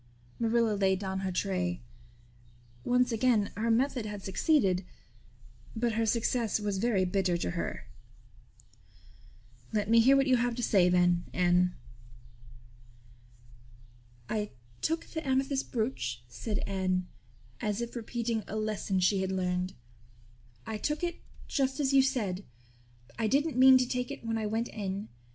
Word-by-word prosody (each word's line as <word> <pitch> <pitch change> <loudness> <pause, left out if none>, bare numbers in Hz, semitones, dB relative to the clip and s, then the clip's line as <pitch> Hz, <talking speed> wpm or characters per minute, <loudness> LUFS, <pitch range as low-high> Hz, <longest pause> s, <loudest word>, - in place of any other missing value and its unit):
Marilla 230 -1 +2
laid 190 -1 +2
down 190 0 -3
her 190 -1 -2
tray. 180 -1 -1 1.0
Once 250 0 +2
again 225 -3 +2
her 225 +2 -1
method 245 -1 +1
had 205 -2 -6
succeeded; 195 - +2 0.9
but 235 +1 0
her 225 +1 0
success 230 0 +1
was 205 -2 -2
very 205 -4 +2
bitter 180 -1 +1
to 90 - -2
her. - - -4 1.9
"Let 210 0 -1
me 230 - +7
hear 265 +4 +6
what 275 - +3
you 260 -2 +4
have 240 0 0
to 245 - -4
say 185 -5 +4
then, 175 -1 +3
Anne." 180 0 +3 2.5
"I 210 -1 -2 0.3
took 325 +1 -1
the 320 - -5
amethyst 270 0 0
brooch," 125 - -2
said 205 - -4
Anne, 185 -2 -1 0.5
as 210 0 -1
if 235 0 -5
repeating 230 -1 -2
a 215 - -5
lesson 215 -3 -1
she 190 +2 +2
had 190 0 -1
learned. 180 0 -1 0.9
"I 220 -1 -4
took 300 +6 -2
it 345 -1 -3 0.3
just 270 0 0
as 275 -1 +1
you 270 - +7
said. 215 -9 -1 0.8
I 225 - +1
didn't 285 +5 +1
mean 260 +1 +8
to 255 -1 +1
take 250 +1 -2
it 280 -4 -8
when 225 0 -1
I 215 - -2
went 225 +3 -1
in. 200 0 -4
215 Hz, 145 wpm, -30 LUFS, 190-245 Hz, 2.5 s, mean